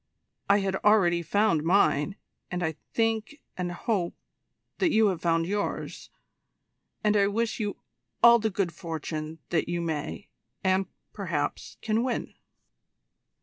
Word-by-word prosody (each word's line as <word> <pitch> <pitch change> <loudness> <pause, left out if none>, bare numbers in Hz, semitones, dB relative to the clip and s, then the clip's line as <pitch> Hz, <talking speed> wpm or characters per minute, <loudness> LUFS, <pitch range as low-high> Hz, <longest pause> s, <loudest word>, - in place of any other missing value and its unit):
I 200 0 +5
had 195 -1 -1
already 190 -5 +4
found 200 -1 +2
mine 165 -1 +3 0.3
and 180 -1 -2
I 160 -1 0 0.2
think, 225 +4 0 0.2
and 180 -1 -3
hope, 180 -1 -1 0.6
that 370 - +3
you 220 -1 +4
have 180 -4 -3
found 165 -1 +2
yours 205 +3 -3 0.9
and 210 0 +3
I 200 -1 +4
wish 225 +3 -1
you 205 -2 -2 0.5
all 235 0 +9
the 220 0 0
good 195 -3 -1
fortune 160 -1 -5
that 170 -1 +1
you 175 0 -1
may, 160 +2 -3 0.4
and, 190 0 +2 0.3
perhaps, 170 -8 -3
can 220 +1 +1
win." 250 -2 -2
190 Hz, 135 wpm, -27 LUFS, 170-215 Hz, 0.9 s, all